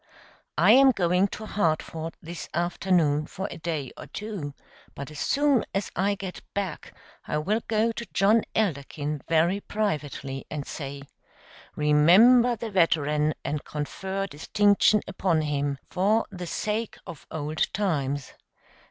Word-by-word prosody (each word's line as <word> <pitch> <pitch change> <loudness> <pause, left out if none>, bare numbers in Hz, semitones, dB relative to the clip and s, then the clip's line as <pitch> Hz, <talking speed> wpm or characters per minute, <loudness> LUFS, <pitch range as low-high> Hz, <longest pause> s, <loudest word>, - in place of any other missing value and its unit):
I - - +6
am 270 +1 +8
going 180 -4 +2
to 215 +2 -7
Hartford 165 -4 -1
this 165 0 -7
afternoon 170 -3 +1
for 190 +1 -5
a - - -8
day 155 -5 -3
or - - -10
two, 195 -10 -6 0.4
but 140 +2 -7
as 150 - -8
soon 280 -4 +2
as 195 0 -1
I 200 +3 +1
get 190 -2 -7
back 200 -1 -4 0.4
I 150 - -1
will 205 +9 0
go 225 +1 +2
to 235 0 -6
John 215 +3 +4
Elderkin 150 -6 -1
very 165 +4 +3
privately 145 -11 -3
and 145 -2 -4
say: 140 -1 -6 0.7
'Remember 190 +12 +6
the 225 0 -6
veteran 155 -4 +2
and 150 0 -2
confer 190 +6 -4
distinction 205 +5 +3
upon 180 -4 +1
him, 145 -2 -1
for 205 +5 +2
the 180 -2 -6
sake 215 +5 -2
of 155 - -10
old 155 0 -2
times. 145 -9 -1
175 Hz, 135 wpm, -26 LUFS, 150-205 Hz, 0.7 s, am